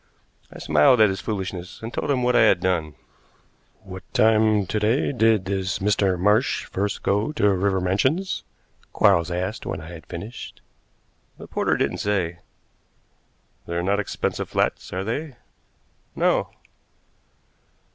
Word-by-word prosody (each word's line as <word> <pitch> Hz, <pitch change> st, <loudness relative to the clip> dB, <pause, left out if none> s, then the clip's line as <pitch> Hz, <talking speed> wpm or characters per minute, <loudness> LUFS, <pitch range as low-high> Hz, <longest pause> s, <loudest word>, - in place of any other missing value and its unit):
I -, -, -11 dB
smiled 75 Hz, -, +4 dB
at 110 Hz, -2 st, +6 dB
his 95 Hz, -, -3 dB
foolishness 95 Hz, -4 st, -5 dB
and 115 Hz, -, -6 dB
told -, -, -3 dB
him 130 Hz, -3 st, +1 dB
what 125 Hz, 0 st, +2 dB
I -, -, +6 dB
had 110 Hz, -, +5 dB
done. 85 Hz, -5 st, -1 dB, 0.9 s
"What 95 Hz, -1 st, -9 dB
time 110 Hz, -2 st, +4 dB
to 105 Hz, +4 st, -2 dB
day 110 Hz, +8 st, +1 dB
did 110 Hz, -6 st, +2 dB
this 95 Hz, 0 st, -2 dB
Mr. 100 Hz, -2 st, +1 dB
Marsh 105 Hz, +7 st, +2 dB
first 100 Hz, +1 st, -3 dB
go 105 Hz, +8 st, +1 dB
to 105 Hz, -9 st, +2 dB
River 95 Hz, 0 st, +1 dB
Mansions?" 130 Hz, -, 0 dB, 0.5 s
Quarles 85 Hz, 0 st, +3 dB
asked 90 Hz, +2 st, -3 dB
when -, -, -4 dB
I 80 Hz, -, -10 dB
had 85 Hz, -2 st, -11 dB
finished. 105 Hz, +8 st, -8 dB, 0.8 s
"The -, -, -10 dB
porter -, -, 0 dB
didn't -, -, -1 dB
say." 90 Hz, -4 st, -1 dB, 1.3 s
"They're 85 Hz, 0 st, -2 dB
not 100 Hz, +2 st, +1 dB
expensive 105 Hz, -, -3 dB
flats, -, -, -1 dB
are 95 Hz, +1 st, -3 dB
they?" 135 Hz, +6 st, -4 dB, 0.8 s
"No." -, -, +1 dB
100 Hz, 140 wpm, -23 LUFS, 90-110 Hz, 1.3 s, at